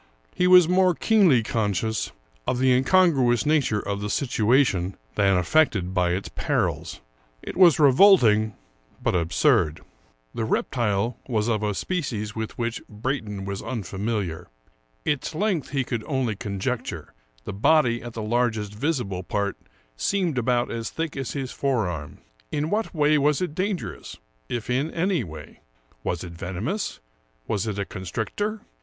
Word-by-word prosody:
He 180 - +2
was 180 -2 +8
more 180 0 +3
keenly 185 - +4
conscious 110 0 -1 0.4
of 125 - +1
the 130 +1 +3
incongruous 130 -2 +3
nature 145 -8 +2
of 100 0 -2
the 105 - -3
situation 110 -6 +1 0.2
than 95 -2 +3
affected 95 - +2
by 90 -2 +2
its 95 +3 -3
perils; - - -2 0.4
it - - -6
was 175 -5 +6
revolting, 125 - +5 0.4
but - - 0
absurd. 85 -2 +2 0.5
The 115 - -2
reptile 110 -1 0
was 110 -4 0
of 110 -3 +1
a 105 -1 -1
species 115 - -3
with 110 -1 -5
which 115 -1 -2
Brayton 105 -3 -4
was 100 0 -4
un 115 -5 -4
familiar. 100 -3 -3 0.6
Its 150 +1 -1
length 185 -4 0
he 135 -1 0
could 120 -3 -3
only 130 -6 -1
conjecture; 100 - -4 0.3
the - - -5
body 120 +1 +3
at 120 -1 -8
the 110 - -5
largest 110 -2 0
visible 115 - -2
part 100 +2 -2 0.4
seemed 180 - 0
about 120 0 +1
as 115 -1 -3
thick 160 -2 -4
as 135 -2 -4
his 135 -3 -4
fore 130 -8 0
arm. 75 -4 -6 0.3
In 150 +2 -1
what 215 -2 -1
way 150 0 +3
was 145 0 +2
it 180 -5 -2
dangerous, 185 +2 -4 0.3
if 120 -2 -3
in 130 +5 0
any 170 -3 0
way? 80 -5 -10 0.4
Was 85 0 -2
it 85 -2 -8
venomous? 95 - -4 0.5
Was 105 0 -1
it 105 -2 -3
a 100 - -1
constrictor? 110 - -4
120 Hz, 150 wpm, -25 LUFS, 100-150 Hz, 0.6 s, was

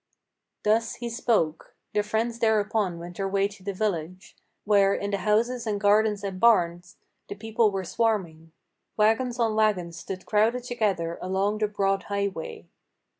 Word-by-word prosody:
Thus 225 +2 +1
he 235 -1 -5
spoke. 210 -9 0 0.2
The 210 - +2
friends 225 +3 -2
thereupon 215 -4 +1
went 175 +1 -9
their 195 -1 -1
way 195 0 +2
to 200 -1 -15
the 200 - -2
village, 185 -2 -3 0.3
Where, 200 -1 +4
in 200 0 -3
the 200 - -1
houses 230 +5 +1
and 205 -2 -1
gardens 210 0 +3
and 190 -2 -4
barns, 175 -6 +2 0.3
the 200 - -5
people 220 +1 +1
were 195 -1 -3
swarming; 170 -8 -1 0.5
Wagons 225 +3 +2
on 230 -2 +1
wagons 200 -6 +1
stood 185 -1 -7
crowded 225 +4 +2
together 200 -9 -1
along 195 +3 0
the 215 - +2
broad 195 -1 0
highway. 200 - -3
205 Hz, 155 wpm, -26 LUFS, 190-220 Hz, 0.5 s, Where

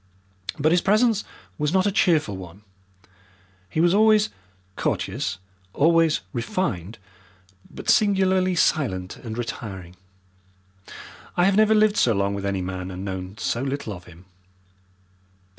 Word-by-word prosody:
But 155 +2 +2
his 175 0 +4
presence 215 +1 +3 0.4
was 150 0 0
not 190 +1 +2
a 205 - +2
cheerful 160 - +2
one. 95 +2 -11 1.1
He - - -3
was 175 +2 +4
always 215 0 +4 0.5
courteous, 90 - -2 0.4
always 165 +1 +3
refined, 115 - -3 0.7
but - - -10
singularly 190 -3 +3
silent 95 - 0
and 115 -2 -7
retiring. 95 -7 -6 1.4
I 175 - +4
have 195 0 +3
never 215 +1 +5
lived 215 -1 +3
so 120 - +3
long 100 0 0
with 100 0 -3
any 95 -2 -1
man 90 0 -5
and 95 +1 -6
known 95 +1 -6
so 120 - -2
little 135 -4 -3
of 90 -2 -11
him. 90 +1 -16
140 Hz, 130 wpm, -24 LUFS, -, 1.4 s, never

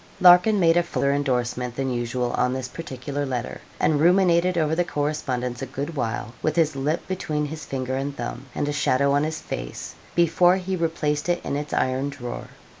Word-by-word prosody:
Larkin 180 +4 +7
made 165 -1 +4
a - - +6
fuller 140 -5 0
endorsement 125 -3 -1
than 135 0 -1
usual 120 0 -1
on 125 0 +1
this 130 -1 -3
particular 140 -1 -5
letter, 125 -3 -4 0.2
and 150 -2 +2
ruminated 180 0 +4
over 155 -1 +2
the 175 +2 +2
correspondence 135 -6 -2
a - - -3
good 145 +4 -5
while, 115 -3 -3
with 155 - 0
his 155 -3 +2
lip 150 +5 -1
between 155 -5 -2
his 155 +1 -6
finger 130 -1 -3
and 140 +1 -3
thumb, 120 +2 -5
and 145 - -1
a 145 - -1
shadow 140 -1 +2
on 145 +1 +3
his 160 +1 -2
face, - - -6 0.2
before 175 +1 +4
he 190 0 -2
replaced 160 -2 -1
it 175 0 +2
in - - -2
its 150 +1 -4
iron 130 +2 0
drawer. 125 -3 -6
145 Hz, 190 wpm, -24 LUFS, 130-165 Hz, 0.2 s, Larkin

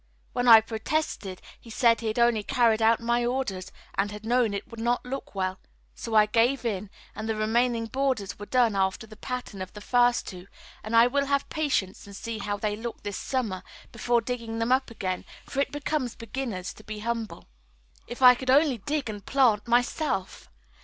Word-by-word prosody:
When 245 0 0
I 225 -2 +10
protested, 220 - -3 0.2
he 230 - -15
said 230 +1 +3
he 225 - -3
had 215 - -2
only 235 -2 +3
carried 230 -1 +2
out 225 +1 +4
my 235 +1 +1
orders 240 -7 -2 0.2
and 195 +1 0
had 210 +1 -9
known 240 -1 +2
it 200 - -5
would 230 - -10
not 240 +2 0
look 265 -4 -6
well; 185 0 -2 0.3
so 225 -1 -5
I 215 -1 +7
gave 235 +5 +1
in, 205 -3 -2 0.2
and 220 +1 -5
the 220 - 0
remaining 230 +2 +1
borders 225 -6 -2
were 205 - -7
done 240 -5 +3
after 190 +3 0
the 215 0 -13
pattern 250 -5 -6
of 185 - -7
the 210 - -9
first 245 +3 +2
two, 180 -1 -9 0.4
and 220 +2 -2
I 230 +1 +8
will 280 +3 +1
have 280 0 +1
patience 265 - -1
and 200 - -10
see 225 +1 -5
how 205 0 -2
they 210 0 -1
look 230 +2 -7
this 205 -2 -4
summer, 225 -8 -2 0.3
before 235 +1 +1
digging 230 -1 -4
them 230 +2 0
up 260 +1 +2
again; 185 -5 -3 0.2
for 270 - -4
it 280 - +1
becomes 290 -4 -2
beginners 230 -5 -5
to 215 - -15
be 215 0 -7
humble. 230 -1 -4 0.6
If 240 +2 -5
I 250 0 +10
could 255 +1 -6
only 275 -2 +4
dig 285 +5 -2
and 205 -2 -6
plant 240 -6 +2
myself! 240 - 0
230 Hz, 200 wpm, -27 LUFS, 210-250 Hz, 0.6 s, I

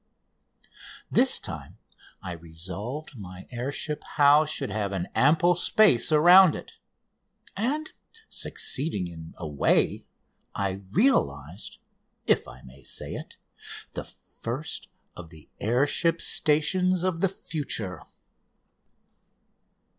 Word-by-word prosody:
This - - +4
time - - -8 0.5
I 90 - -5
resolved 95 - -7
my 95 -1 -10
air 125 +3 -4
ship 150 +1 -3
house 150 +1 +4
should 155 - -3
have 100 -1 -2
an 90 -2 -3
ample 165 +6 +4
space 175 - +3
around 175 +3 +7
it. - - -11 0.8
And, 285 +10 -2 0.4
succeeding 130 - 0
in 80 -2 -10
a 85 - -6
way, 75 -2 +1 0.5
I 100 0 -2
realised 85 - 0 0.5
if - - +2
I 65 - -13
may 65 +1 -15
say - - -6
it - - -9 0.6
the - - -6
first 135 +7 -7 0.3
of 85 -2 -10
the 80 -2 -16
air 120 +6 +2
ship 165 +3 +2
stations 175 +5 +3
of 185 -3 -1
the 195 - +2
future. 130 - -2
130 Hz, 110 wpm, -26 LUFS, -, 0.8 s, around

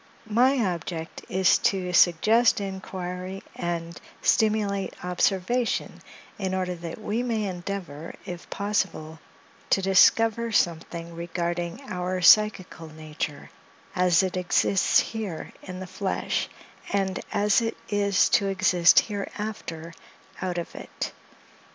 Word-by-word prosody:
My 255 +5 +4
object 170 -2 -4
is 190 -1 +3
to 185 -2 0
suggest 215 +8 +4
inquiry 190 -1 -5
and 170 -1 -4 0.2
stimulate 210 -4 +1
observation, 195 +6 0 0.4
in 190 -2 -1
order 185 -1 -1
that 170 +1 -7
we 215 +2 -2
may 230 -3 -1
endeavor, 175 -4 -6
if 175 -1 -8
possible, 160 -6 -2 0.5
to - - +4
discover 225 +4 +4
something 170 -3 -1
regarding 175 +4 -3
our 180 0 -2
psychical 185 -3 +4
nature, 155 -1 -6 0.4
as 180 -1 +4
it 185 -1 -2
exists 180 +1 +3
here 210 -8 -4
in 185 -1 -8
the 185 - -6
flesh; 190 +1 -2 0.4
and 195 -2 0
as 205 +1 +3
it 225 0 -2
is 200 -1 +2
to 200 - +3
exist 185 -3 +5
hereafter, 200 -5 -6 0.5
out 180 -1 -2
of 170 - -5
it. - - -6
185 Hz, 115 wpm, -26 LUFS, 175-205 Hz, 0.5 s, exist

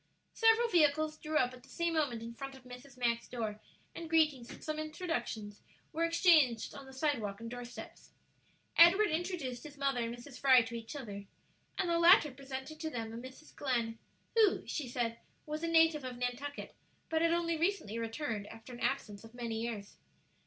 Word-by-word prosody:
Several 455 +1 +5
vehicles 310 -4 +3
drew 310 0 -1
up 250 -2 +2
at 250 - -12
the 265 - -19
same 340 0 -1
moment 270 -8 0
in 230 0 -7
front 270 +2 -7
of 265 - -15
Mrs. 250 +1 -12
Mack's 235 -1 0
door, 220 -4 -4 0.3
and 335 -1 -7
greetings 305 -7 +2
and - - -11
some 310 0 -3
introductions 310 - -4 0.3
were 330 - 0
exchanged 325 -9 +4
on 275 -1 -10
the - - -11
sidewalk 260 -8 -1
and 230 0 -7
door 245 0 -5
steps. 240 0 -10 0.7
Edward 360 +5 +7
introduced 315 -7 -2
his 290 -1 -11
mother 275 -2 0
and 235 0 -2
Mrs. 250 +2 -11
Fry 260 -3 +7
to 230 +1 -8
each 230 +4 -6
other, 205 -7 -6 0.5
and 380 - 0
the 340 0 +2
latter 335 -3 +7
presented 270 +3 -7
to 320 -1 -3
them 225 -5 -5
a - - -6
Mrs. 260 +5 -11
Glenn, 235 -4 -1 0.4
who, 435 -4 +4
she 290 -5 -3
said, 235 -1 -2 0.3
was 305 +1 -4
a 335 - -1
native 325 -3 +4
of 250 -1 -5
Nantucket, 250 +4 -4 0.3
but 320 0 0
had 335 0 +3
only 335 0 +1
recently 325 - -1
returned 225 -2 -3
after 225 +3 -11
an 240 - -9
absence 210 -7 -2
of 225 +1 -14
many 230 -2 -3
years. 220 -4 -5
265 Hz, 190 wpm, -33 LUFS, 235-315 Hz, 0.7 s, Edward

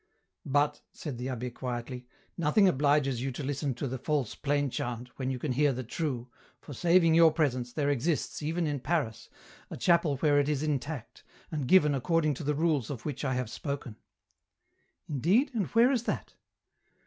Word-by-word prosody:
" - - -56
But," 145 +2 +1
said 140 -7 -6
the 125 - -3
abh6 125 -1 -4
quietly, 125 0 -5 0.2
" - - -35
nothing 170 +5 +4
obliges 140 -5 +2
you 135 +1 -2
to 140 - -5
listen 140 -1 -2
to 135 - -3
the 130 0 -4
false 145 -4 -1
plain 145 -1 0
chant, 120 +1 -4
when 130 -1 -1
you 130 - -2
can 130 +2 -3
hear 145 +3 +3
the 130 +1 -4
true, 125 -1 -3 0.3
for 145 - -10
saving 170 +3 +4
your 165 0 +7
presence, 130 -6 0
there 145 +1 0
exists, 145 +5 -1
even 165 +3 -1
in 145 -2 -1
Paris, 130 -7 -2 0.4
a - - -6
chapel 170 -5 +3
where 145 +1 +3
it 145 +1 +1
is 150 -1 0
intact, 145 -4 -3 0.3
and 150 -5 -2
given 150 -4 +5
according 155 +3 +1
to 140 - -7
the 150 +1 0
rules 150 -6 +1
of 130 -6 -6
which 145 -2 -4
I 130 -2 0
have 125 -2 -1
spoken." 140 -6 -5 0.6
" - - -46
Indeed, 185 - +2
and 210 -7 0
where 235 +3 +4
is 240 -4 0
that - - -3
145 Hz, 195 wpm, -29 LUFS, 130-160 Hz, 0.6 s, your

